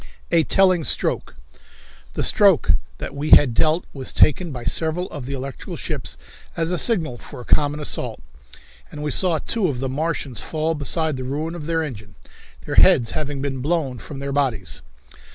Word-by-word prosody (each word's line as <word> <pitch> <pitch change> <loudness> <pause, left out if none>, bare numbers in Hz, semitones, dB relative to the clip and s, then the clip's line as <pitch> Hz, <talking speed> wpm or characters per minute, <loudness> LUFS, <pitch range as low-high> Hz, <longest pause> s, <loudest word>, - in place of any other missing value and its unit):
A 165 -1 +4
Telling 185 -1 +3
Stroke. - - -1 0.8
The - - -1
stroke - - +4 0.3
that - - -6
we 145 +2 -3
had 135 -6 +7
dealt 155 +8 +2
was 135 -2 -3
taken 165 +3 +3
by 125 -3 -6
several 160 +6 0
of 140 -5 -7
the 140 - -3
electrical 135 0 -6
ships - - -3 0.4
as 165 +1 0
a 180 - 0
signal 160 - 0
for - - -10
a - - -11
common 145 0 +2
assault, 150 - -1 0.7
and 150 - -7
we 150 - -1
saw 175 +2 +1
two 205 +6 -1
of 135 -6 -2
the 135 0 -2
Martians 140 -4 -1
fall 160 +1 -1
beside 155 0 -1
the 130 - -5
ruin 150 +6 -3
of 165 -3 -7
their 165 -1 0
engine, 110 -8 -8 0.5
their - - -3
heads 115 -2 +5
having 145 -2 -3
been 135 -2 -2
blown 140 -4 -1
from 135 +7 -8
their 140 0 -4
bodies. 120 - -1
150 Hz, 180 wpm, -22 LUFS, 135-165 Hz, 0.8 s, had